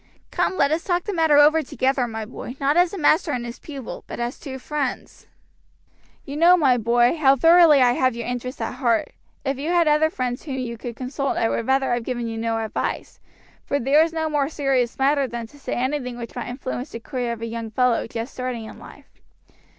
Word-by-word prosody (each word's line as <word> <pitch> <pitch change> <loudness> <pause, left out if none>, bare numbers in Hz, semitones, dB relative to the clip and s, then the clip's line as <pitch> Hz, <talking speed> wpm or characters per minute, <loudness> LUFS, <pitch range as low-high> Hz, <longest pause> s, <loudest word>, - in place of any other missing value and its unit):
Come 375 - 0
let 280 +1 +3
us 320 +2 0
talk 350 -1 0
the 415 - -4
matter 320 -4 +3
over 305 +2 +6
together, 265 -2 0
my 220 -1 -5
boy, 245 +2 -8
not 280 +2 +1
as 350 0 +4
a 400 - -6
master 310 -1 +2
and 245 -2 -3
his 235 +1 -8
pupil, 275 -6 -8
but - - -7
as 240 +1 -3
two 265 -3 -7
friends. 280 0 -4 1.0
"You 280 0 -6
know, 345 +3 +6
my 275 -7 +4
boy, 240 +4 +3
how 275 -3 +5
thoroughly 325 -1 +6
I 245 - +5
have 255 0 +1
your 235 -1 -5
interest 250 +1 -5
at 225 - -3
heart. 235 -4 +1 0.3
If 270 -1 -1
you 300 +4 -3
had 345 -2 +3
other 300 +1 +4
friends 250 -4 -3
whom 275 -4 -5
you 245 -2 -4
could 235 0 -7
consult 270 +2 -3
I 225 - +1
would 230 - -2
rather 265 -1 +2
have 240 -1 -1
given 240 -1 -3
you 225 0 -4
no 225 0 -1
advice, 220 -1 -4 0.4
for 285 - -1
there 280 +5 +4
is 325 0 +2
no 320 -1 -2
more 295 -2 0
serious 270 -6 0
matter 275 0 +2
than 235 -1 -5
to 285 +6 -17
say - - -5
anything 250 -1 -2
which 235 -1 -8
might 245 - -5
influence 255 +1 -5
the 230 - -7
career 245 -1 -3
of 230 0 -8
a - - -1
young 230 0 -5
fellow 245 +1 +1
just 230 +3 -6
starting 250 -3 -4
in - - -11
life. - - -16
260 Hz, 225 wpm, -23 LUFS, 240-295 Hz, 1.0 s, over